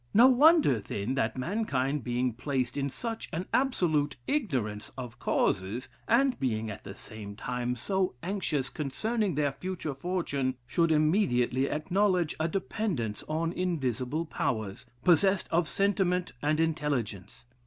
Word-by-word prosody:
No 235 Hz, +4 st, +9 dB
wonder, 285 Hz, -, +6 dB
then, 100 Hz, +4 st, -3 dB
that 125 Hz, -3 st, 0 dB
mankind, 140 Hz, -, -1 dB
being 125 Hz, 0 st, 0 dB
placed 125 Hz, 0 st, -2 dB
in 140 Hz, -1 st, -1 dB
such 225 Hz, -, -5 dB
an 170 Hz, +3 st, -3 dB
absolute 165 Hz, -, +2 dB
ignorance 125 Hz, -, -1 dB
of 125 Hz, -2 st, -7 dB
causes, 100 Hz, +8 st, 0 dB, 0.2 s
and 255 Hz, +3 st, +3 dB
being 110 Hz, -4 st, -1 dB
at 100 Hz, -, -9 dB
the -, -, -8 dB
same 105 Hz, -2 st, -9 dB
time 125 Hz, +2 st, -2 dB
so 185 Hz, -, -1 dB
anxious 165 Hz, -9 st, -1 dB
concerning 195 Hz, -, -1 dB
their 145 Hz, -1 st, +1 dB
future 170 Hz, 0 st, -4 dB
fortune, 140 Hz, -4 st, -1 dB
should 165 Hz, +6 st, +2 dB
immediately 150 Hz, -, +2 dB
acknowledge 180 Hz, +1 st, +1 dB
a 160 Hz, -, +1 dB
dependence 170 Hz, -, -2 dB
on 165 Hz, +2 st, -1 dB
invisible 150 Hz, -4 st, -1 dB
powers, 110 Hz, -10 st, -3 dB, 0.2 s
possessed 190 Hz, +2 st, +4 dB
of 165 Hz, 0 st, +2 dB
sentiment 185 Hz, -2 st, +1 dB
and 150 Hz, +1 st, +1 dB
intelligence. 130 Hz, -, -2 dB
150 Hz, 130 wpm, -29 LUFS, 125-185 Hz, 0.2 s, No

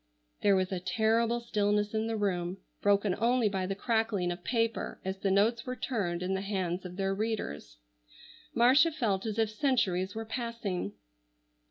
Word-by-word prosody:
There 200 Hz, -1 st, +5 dB
was 185 Hz, 0 st, 0 dB
a 185 Hz, -, -1 dB
terrible 225 Hz, +5 st, +1 dB
stillness 210 Hz, -2 st, 0 dB
in 220 Hz, +1 st, 0 dB
the 225 Hz, -1 st, -1 dB
room, 185 Hz, -3 st, -1 dB, 0.2 s
broken 200 Hz, -1 st, +3 dB
only 240 Hz, 0 st, +3 dB
by 190 Hz, -2 st, -2 dB
the 195 Hz, -, -2 dB
crackling 220 Hz, -5 st, 0 dB
of 175 Hz, 0 st, -6 dB
paper 230 Hz, -2 st, -1 dB
as 190 Hz, 0 st, -3 dB
the 195 Hz, -, 0 dB
notes 215 Hz, +5 st, +3 dB
were 255 Hz, -1 st, -4 dB
turned 195 Hz, -8 st, -2 dB
in 185 Hz, +1 st, -1 dB
the 190 Hz, -, -1 dB
hands 190 Hz, -3 st, -2 dB
of 180 Hz, 0 st, -7 dB
their 195 Hz, 0 st, 0 dB
readers. 195 Hz, -, -3 dB, 0.8 s
Marcia 260 Hz, +8 st, +6 dB
felt 220 Hz, -9 st, -1 dB
as 215 Hz, 0 st, -3 dB
if 220 Hz, -1 st, +1 dB
centuries 210 Hz, -7 st, +1 dB
were 225 Hz, 0 st, -4 dB
passing. 220 Hz, -, -3 dB
205 Hz, 170 wpm, -30 LUFS, 190-230 Hz, 0.8 s, Marcia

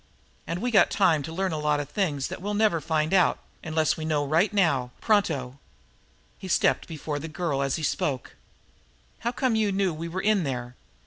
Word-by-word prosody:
"And 175 Hz, +5 st, -3 dB
we 245 Hz, -, 0 dB
got 200 Hz, -6 st, +5 dB
time 155 Hz, -3 st, +3 dB
to 145 Hz, -, -6 dB
learn 190 Hz, +3 st, -1 dB
a 155 Hz, -, -2 dB
lot 150 Hz, -1 st, +1 dB
of 145 Hz, -, -4 dB
things 150 Hz, -10 st, -1 dB
that -, -, -7 dB
we'll 205 Hz, +2 st, -2 dB
never 205 Hz, -6 st, +2 dB
find 160 Hz, +1 st, 0 dB
out, 185 Hz, -3 st, +4 dB, 0.3 s
unless 160 Hz, -1 st, +1 dB
we 160 Hz, -, -5 dB
know 150 Hz, -2 st, 0 dB
right 160 Hz, +9 st, +2 dB
now, 160 Hz, -11 st, +2 dB
pronto!" 145 Hz, -, 0 dB, 0.8 s
He 190 Hz, -, -7 dB
stepped 185 Hz, -, +2 dB
before 155 Hz, -2 st, -4 dB
the 160 Hz, -, -6 dB
girl, 155 Hz, -3 st, -2 dB
as 135 Hz, -1 st, 0 dB
he 160 Hz, -, -5 dB
spoke. 135 Hz, -3 st, -2 dB, 0.8 s
"How 235 Hz, -, -1 dB
come 250 Hz, 0 st, 0 dB
you 215 Hz, -2 st, +2 dB
knew 195 Hz, -2 st, +1 dB
we 165 Hz, +2 st, -5 dB
were 175 Hz, +3 st, -4 dB
in 210 Hz, 0 st, +2 dB
there? 125 Hz, -3 st, -4 dB
160 Hz, 200 wpm, -26 LUFS, 145-195 Hz, 0.8 s, got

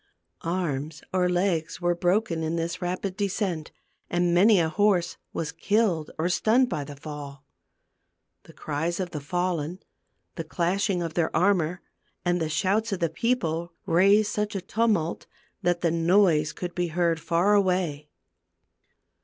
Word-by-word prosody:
Arms 155 Hz, -4 st, -3 dB
or 180 Hz, -1 st, +2 dB
legs 175 Hz, -3 st, 0 dB
were 175 Hz, -1 st, +1 dB
broken 175 Hz, -1 st, 0 dB
in 160 Hz, +1 st, -1 dB
this 170 Hz, +2 st, -3 dB
rapid 185 Hz, +2 st, -3 dB
descent, 190 Hz, -5 st, -2 dB, 0.4 s
and 175 Hz, 0 st, +1 dB
many 200 Hz, +3 st, +6 dB
a 165 Hz, -, +2 dB
horse 180 Hz, +1 st, +1 dB
was 155 Hz, -3 st, -3 dB
killed 175 Hz, -1 st, +1 dB
or 160 Hz, +2 st, 0 dB
stunned 230 Hz, +8 st, +3 dB
by 145 Hz, -, -2 dB
the 145 Hz, 0 st, -9 dB
fall. 145 Hz, -1 st, -8 dB, 1.0 s
The -, -, -15 dB
cries 160 Hz, +4 st, -3 dB
of 180 Hz, -2 st, -3 dB
the 155 Hz, -, -4 dB
fallen, 175 Hz, 0 st, -2 dB, 0.6 s
the 165 Hz, -, -2 dB
clashing 180 Hz, +3 st, 0 dB
of 165 Hz, -2 st, -4 dB
their 160 Hz, -1 st, +1 dB
armor, 180 Hz, -1 st, +1 dB, 0.4 s
and 175 Hz, 0 st, +1 dB
the 160 Hz, -, -1 dB
shouts 205 Hz, +7 st, +1 dB
of 195 Hz, -, -2 dB
the 170 Hz, -2 st, +1 dB
people, 170 Hz, -7 st, -1 dB
raised 200 Hz, +5 st, +4 dB
such 210 Hz, -1 st, -2 dB
a 195 Hz, -, -2 dB
tumult 210 Hz, -6 st, 0 dB, 0.3 s
that 175 Hz, -2 st, +1 dB
the 170 Hz, -, +2 dB
noise 165 Hz, -2 st, +3 dB
could 175 Hz, -1 st, -6 dB
be 175 Hz, -1 st, -1 dB
heard 170 Hz, 0 st, +1 dB
far 175 Hz, +5 st, +2 dB
away. 180 Hz, -7 st, +1 dB
175 Hz, 150 wpm, -26 LUFS, 160-190 Hz, 1.0 s, many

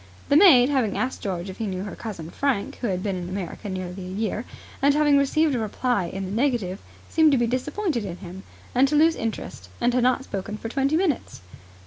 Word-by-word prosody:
The 285 Hz, -, +4 dB
maid, 285 Hz, -8 st, +7 dB
having 255 Hz, -8 st, +1 dB
asked 255 Hz, +1 st, -2 dB
George 185 Hz, -2 st, -3 dB
if 190 Hz, +2 st, -8 dB
he 225 Hz, -, -2 dB
knew 185 Hz, -1 st, -3 dB
her 200 Hz, -, -6 dB
cousin 175 Hz, -8 st, -7 dB
Frank, 270 Hz, -8 st, -1 dB
who 240 Hz, -, -2 dB
had 185 Hz, -2 st, -2 dB
been 195 Hz, -2 st, -1 dB
in 175 Hz, -1 st, -5 dB
America 195 Hz, +2 st, -5 dB
nearly 185 Hz, 0 st, -5 dB
a 180 Hz, -, -7 dB
year, 215 Hz, +4 st, -2 dB, 0.4 s
and 280 Hz, +1 st, +4 dB
having 295 Hz, -1 st, +4 dB
received 290 Hz, +2 st, +3 dB
a 245 Hz, -, 0 dB
reply 220 Hz, -1 st, 0 dB
in 195 Hz, +3 st, -5 dB
the 185 Hz, -, -6 dB
negative, 220 Hz, -5 st, 0 dB, 0.3 s
seemed 320 Hz, -2 st, +4 dB
to -, -, +4 dB
be 240 Hz, -, +2 dB
disappointed 260 Hz, -, -1 dB
in 180 Hz, -3 st, -5 dB
him, 185 Hz, +1 st, -9 dB, 0.3 s
and 260 Hz, +2 st, +4 dB
to 300 Hz, -, 0 dB
lose 320 Hz, +2 st, +5 dB
interest, 215 Hz, -, -5 dB
and 245 Hz, -, +2 dB
had 250 Hz, -, +2 dB
not 255 Hz, +2 st, +2 dB
spoken 200 Hz, -3 st, -5 dB
for 225 Hz, -, -6 dB
twenty 275 Hz, +5 st, +1 dB
minutes. 335 Hz, -, -1 dB
230 Hz, 225 wpm, -24 LUFS, 190-275 Hz, 0.4 s, maid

